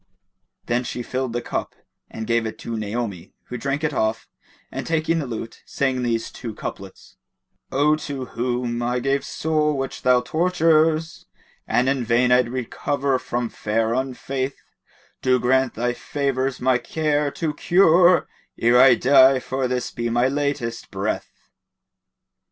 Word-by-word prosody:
Then 120 +1 0
she 120 0 -5
filled 130 0 -3
the 120 +1 -3
cup - - -4 0.3
and 110 - -6
gave 115 -1 +1
it 110 - -7
to 115 - -5
Naomi, 105 -4 -4 0.2
who 125 - -4
drank 140 +4 -2
it 155 -1 0
off 110 -2 -1 0.4
and - - -5
taking 165 0 +1
the 145 - -3
lute, 115 -1 -7
sang 130 -2 -1
these 115 -2 -1
two 115 -4 -7
couplets, 95 -2 -8 0.5
"O 150 +3 +3
to 140 -4 -5
whom 120 0 -2
I 120 +1 0
gave 135 +2 0
soul 150 -2 0
which 135 0 -4
thou 125 -1 +4
tortures", 160 0 +1 0.2
* - - -35
And 125 - +2
in 135 -2 +1
vain 120 +2 +2
I'd 125 -1 +4
recover 130 +2 -1
from 120 -1 -2
fair 110 +2 -1
Unfaith 130 +1 -3 0.6
Do 130 -1 +3
grant 130 +1 +2
thy 120 +2 0
favours 135 -1 -2
my 125 -1 +2
care 150 -1 0
to 160 -3 -2
cure 175 0 +4 0.2
* - - -44
Ere 120 +2 +5
I 130 -2 +7
die, 130 +2 +6
for 130 0 -2
this 125 -1 -2
be 120 0 -3
my 120 +2 +2
latest 140 -4 -2
breath." - - -3
130 Hz, 155 wpm, -22 LUFS, 120-145 Hz, 0.6 s, I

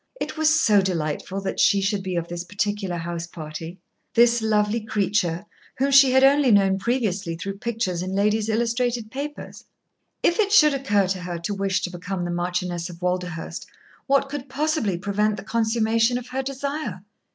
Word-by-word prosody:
It - - -4
was 315 -1 +3
so 205 -2 +4
delightful 185 +1 -2
that 195 - -4
she 200 0 +4
should 195 +1 0
be 185 -1 -4
of 170 -1 -2
this 175 0 -5
particular 205 -1 -2
house 170 0 -4
party 160 +1 -8 0.4
this 235 0 +5
lovely 215 +1 +1
creature, 200 -4 0 0.3
whom 275 +2 +1
she 275 -1 +7
had 265 +1 +4
only 275 0 +5
known 195 -3 +4
previously 200 -6 -1
through 195 +3 -6
pictures 220 -7 -2
in 185 +1 -3
ladies' 210 +2 +1
illustrated 235 0 -1
papers. 290 +3 -7 0.6
If 345 - +2
it 410 -2 +2
should 305 -8 +6
occur 205 -8 +1
to 190 -1 -1
her 180 -1 -4
to 185 +5 -3
wish 195 -1 0
to 180 - -3
become 180 0 -4
the 175 - -3
Marchioness 175 0 -2
of 170 -1 -11
Walderhurst, 180 -2 -3 0.4
what 275 0 +3
could 275 -1 -6
possibly 275 - 0
prevent 205 +3 0
the - - -7
consummation 225 +1 +1
of 250 0 -8
her 265 +1 -2
desire? 275 - -4
205 Hz, 175 wpm, -23 LUFS, 180-245 Hz, 0.6 s, she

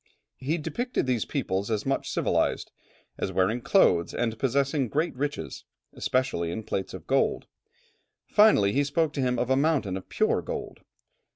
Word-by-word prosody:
He 145 +6 -1
depicted 175 - -2
these 125 -4 0
people 100 -9 -1
as 105 -2 -1
much 135 - -1
civilized, - - 0 0.5
as - - -2
wearing 100 +6 +1
clothes, 90 - +3
and 115 -2 -1
possessing 140 +1 +1
great 155 +5 -1
riches, 145 +3 -4 0.3
especially 125 -10 -1
in 110 +6 -4
plates 95 -2 -3
of 90 -3 -10
gold; 135 +5 +1 0.8
finally, 205 - +5
he 140 - +3
spoke 145 +2 0
to 140 - -2
him 125 -1 +1
of 125 +2 -1
a - - +5
mountain 135 - +1
of 95 - -7
pure - - +1
gold. - - -6
130 Hz, 160 wpm, -27 LUFS, 105-145 Hz, 0.8 s, finally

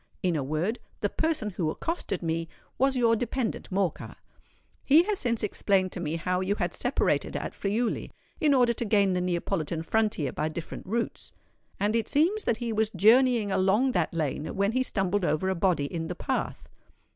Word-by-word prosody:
In 180 -2 +2
a 145 - 0
word, 155 - -1 0.2
the - - +1
person 310 -10 -1
who 175 -4 -1
accosted 205 - -3
me, 165 0 -2 0.3
was 270 0 +3
your 230 -2 +4
dependant 240 +1 -2
Morcar. 190 -3 -1 0.7
He 305 +5 +6
has 410 +1 -1
since 235 -3 -1
explained 195 -2 +1
to - - -5
me 160 -2 -2
how 180 +2 -1
you 195 +2 0
had - - -2
separated - - 0
at - - -3
Friuli, 220 +4 -1 0.3
in 300 -5 +4
order 245 -2 +4
to 235 - -3
gain 200 -3 +3
the 180 - 0
Neapolitan 170 -2 -2
frontier 205 -8 0
by 155 - -2
different 160 +2 -7
routes; 230 +4 -3 0.5
and 205 +3 +1
it 230 - 0
seems 355 +9 +2
that 230 - +1
he 235 -1 -3
was 215 0 +1
journeying 235 -1 +4
along 200 +8 +3
that - - 0
lane, 155 -2 -2
when 200 +1 +1
he 255 +2 +1
stumbled 200 -5 0
over 175 +2 +1
a - - +2
body 170 -5 +1
in 165 +2 -4
the 180 - -4
path. - - -3
200 Hz, 185 wpm, -27 LUFS, 175-235 Hz, 0.7 s, He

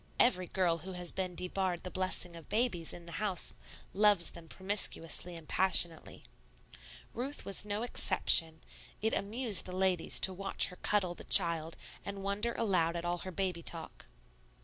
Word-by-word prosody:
Every 185 -7 +3
girl 175 -3 0
who 190 +2 -8
has 180 -1 -1
been 185 -2 -4
debarred 180 -1 -2
the 180 - -6
blessing 185 -2 0
of 165 -2 -13
babies 215 -8 -1
in 175 - -9
the 170 - -10
house 195 -4 -3 0.4
loves 205 -3 +4
them 170 -1 -11
promiscuously 185 -3 0
and 165 -2 -11
passionately. 175 -3 +1 0.9
Ruth 265 +5 -5
was 195 0 -1
no 210 +2 -3
exception; 160 -8 +3 0.4
it 220 +1 0
amused 215 +1 0
the 180 - -7
ladies 185 -3 +2
to 190 - +3
watch 195 +1 +2
her 180 - -12
cuddle 190 -3 0
the - - -11
child 165 -3 +4 0.3
and 200 -1 -7
wonder 205 +4 -1
aloud 180 -7 0
at 170 0 -4
all 175 0 -2
her 185 - -6
baby 180 -2 -3
talk. - - -4
185 Hz, 165 wpm, -32 LUFS, 170-200 Hz, 0.9 s, loves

